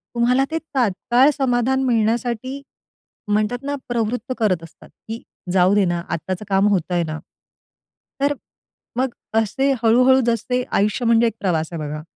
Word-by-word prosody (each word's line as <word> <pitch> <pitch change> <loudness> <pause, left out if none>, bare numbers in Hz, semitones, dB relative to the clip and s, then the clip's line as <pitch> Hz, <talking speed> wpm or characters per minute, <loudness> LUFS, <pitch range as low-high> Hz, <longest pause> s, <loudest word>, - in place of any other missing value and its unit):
तुम्हाला 250 +3 +3
ते 325 - 0
तात्काळ 255 - +2
समाधान 265 0 +1
मिळण्यासाठी, 240 +2 0 0.7
म्हणतात 215 +5 0
ना, 285 +1 -2
प्रवृत्त 240 +1 -2
करत 185 -7 +1
असतात, 165 - -14
की 225 +1 -9 0.3
जाऊ 185 +1 +4
दे 205 -2 +4
ना, 175 -1 -1
आत्ताचं 185 +4 -3
काम 195 +1 +3
होतंय 180 -3 +1
ना. 160 -1 -5 1.0
तर 285 +1 +3 0.6
मग 260 +1 +1 0.3
असे 225 +5 +2
हळू-हळू 250 +3 +5
जसे 240 +2 0
आयुष्य 210 +4 +1
म्हणजे 230 0 +4
एक 225 - -2
प्रवास 165 -5 0
आहे 170 - -5
बघा. 150 0 -5
230 Hz, 145 wpm, -21 LUFS, 195-250 Hz, 1.0 s, हळू-हळू